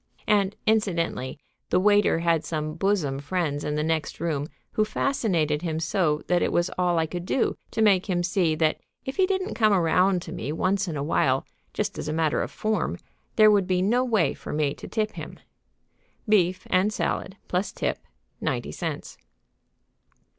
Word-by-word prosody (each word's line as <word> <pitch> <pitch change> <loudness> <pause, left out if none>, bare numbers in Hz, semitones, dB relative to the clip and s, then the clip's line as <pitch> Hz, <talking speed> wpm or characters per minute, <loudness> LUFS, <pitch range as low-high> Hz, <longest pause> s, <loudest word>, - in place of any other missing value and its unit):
And, 205 -2 +2
incidentally, 175 -12 0 0.3
the 180 - +3
waiter 205 -3 +4
had 170 -2 +2
some 155 -1 -3
bosom 165 -6 0
friends 150 -1 -2
in 150 - -2
the 150 - 0
next 160 -1 -1
room 150 -3 -1 0.2
who 215 - +2
fascinated 185 - 0
him 160 -2 -2
so 160 -2 0
that 175 -1 +2
it - - +1
was 175 +1 +1
all 180 -1 +1
I 160 - +2
could 175 +2 -5
do 230 - 0
to 220 - 0
make 195 -2 +3
him 175 -1 +1
see 175 -3 +1
that 155 0 +1 0.3
if 265 - -5
he 380 -1 +4
didn't 380 +1 -1
come 215 -3 +3
around 180 +1 +3
to - - -8
me 130 +6 -4
once 190 +4 0
in 160 -4 -3
a 140 - -2
while, 135 -3 +1 0.3
just - - -3
as - - -4
a 155 - -1
matter 160 -1 +1
of - - -3
form, 215 0 -1 0.4
there 215 -1 +7
would 200 -3 +3
be 185 -1 +1
no 240 +6 +3
way 220 -9 +2
for - - -8
me 150 -2 0
to - - -10
tip 215 -1 -1
him. - - -9 0.9
Beef 185 -3 +2
and 190 +3 +3
salad, 190 -2 -2
plus 185 +2 -1
tip, - - -2 0.4
ninety - - -2
cents. - - -5
180 Hz, 180 wpm, -25 LUFS, 160-205 Hz, 0.9 s, there